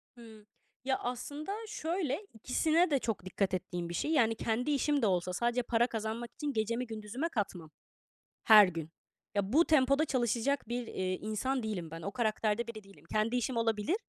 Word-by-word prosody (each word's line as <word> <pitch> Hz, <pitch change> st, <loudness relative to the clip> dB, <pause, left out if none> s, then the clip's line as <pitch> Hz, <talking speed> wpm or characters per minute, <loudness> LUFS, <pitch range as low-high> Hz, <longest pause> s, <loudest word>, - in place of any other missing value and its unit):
Hımm. 220 Hz, -3 st, -14 dB, 0.4 s
Ya, 265 Hz, -1 st, +1 dB
aslında, 285 Hz, +7 st, -4 dB, 0.2 s
şöyle 350 Hz, -3 st, -2 dB
ikisine 315 Hz, +10 st, +2 dB
de 275 Hz, -, +3 dB
çok 220 Hz, -6 st, -3 dB
dikkat 190 Hz, +1 st, -1 dB
ettiğim 180 Hz, -2 st, -3 dB
bir -, -, -5 dB
şey. 300 Hz, -, -1 dB
Yani, 230 Hz, -7 st, +3 dB
kendi 230 Hz, +6 st, -1 dB
işim 290 Hz, 0 st, +2 dB
de 225 Hz, -, +3 dB
olsa 180 Hz, -1 st, 0 dB
sadece 240 Hz, +4 st, 0 dB
para 235 Hz, +1 st, +2 dB
kazanmak 225 Hz, +1 st, -4 dB
için 295 Hz, -2 st, -3 dB
gecemi 230 Hz, +2 st, -1 dB
gündüzüme 225 Hz, +8 st, -4 dB
katmam 190 Hz, -, -3 dB, 0.7 s
her 215 Hz, -3 st, +9 dB
gün. 165 Hz, -3 st, -5 dB, 0.5 s
Ya, 200 Hz, +2 st, 0 dB
bu 330 Hz, +4 st, +6 dB
tempoda 275 Hz, 0 st, +4 dB
çalışacak 255 Hz, 0 st, 0 dB
bir, 240 Hz, 0 st, -3 dB
eee, 185 Hz, 0 st, -2 dB
insan 220 Hz, +6 st, -2 dB
değilim 185 Hz, -7 st, -4 dB
ben, 165 Hz, 0 st, -7 dB
o 200 Hz, -, -4 dB
karakterde 220 Hz, -1 st, 0 dB
biri 220 Hz, -2 st, -7 dB
değilim. 195 Hz, -6 st, -18 dB
Kendi 215 Hz, +3 st, +1 dB
işim 245 Hz, 0 st, -1 dB
olabilir. 225 Hz, -, +1 dB
230 Hz, 175 wpm, -32 LUFS, 210-265 Hz, 0.7 s, her